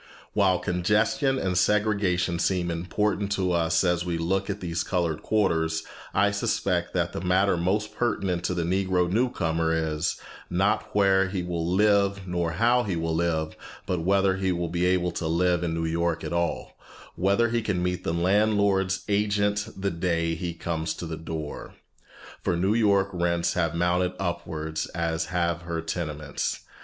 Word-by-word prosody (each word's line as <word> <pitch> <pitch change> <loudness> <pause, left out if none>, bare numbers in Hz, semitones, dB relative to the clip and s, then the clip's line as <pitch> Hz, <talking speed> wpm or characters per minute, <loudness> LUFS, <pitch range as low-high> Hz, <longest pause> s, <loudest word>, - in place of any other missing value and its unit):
While 95 -3 +3
congestion 105 - +1
and 95 -7 -1
segregation 100 -4 +1
seem 90 -2 0
important 100 +4 -1
to 95 -2 0
us 85 -1 +2
as 90 -1 +1
we 85 -2 -2
look 95 +4 -1
at 100 0 -3
these 85 -1 -2
colored 85 -4 -1
quarters, 80 -6 +1 0.3
I 100 +1 +3
suspect 90 -3 -1
that 85 -1 0
the - - -4
matter 95 +1 +3
most 95 +5 -1
pertinent 95 -7 -1
to 90 - 0
the 85 - 0
Negro 90 0 +1
new 115 +8 +2
comer 80 -6 0 0.2
is, 75 +4 -1 0.3
not 100 +5 0
where 95 -1 +4
he 95 -2 -2
will 85 -2 -2
live 100 0 +2
nor 85 -2 -1
how 120 +8 +3
he 100 -7 -2
will 80 0 -1
live, 80 -1 0 0.3
but 90 -2 -1
whether 95 +1 +2
he 95 -1 0
will 85 -1 -2
be 90 +1 +1
able 90 -1 +1
to 85 - -3
live 90 +1 +2
in 80 -1 -1
New 80 0 -1
York 85 0 -1
at - - -4
all, 85 0 -2 0.4
whether 100 +6 +2
he 120 0 0
can 95 -5 -1
meet 90 0 -1
the - - -1
landlord's 95 +1 +2
agent 105 0 +1
the 100 0 -1
day 85 -1 0
he 85 0 -4
comes 80 -1 -3
to - - -6
the 80 -1 -4
door. 80 -2 -6 0.7
For 85 - 0
New 95 +4 +2
York 100 -4 +3
rents 85 -1 0
have 85 -3 0
mounted 90 +1 +1
upwards 80 -4 -3
as 80 -1 -1
have 85 0 -1
her 85 -1 -4
tenements. 75 -3 -3
90 Hz, 170 wpm, -26 LUFS, 85-100 Hz, 0.7 s, where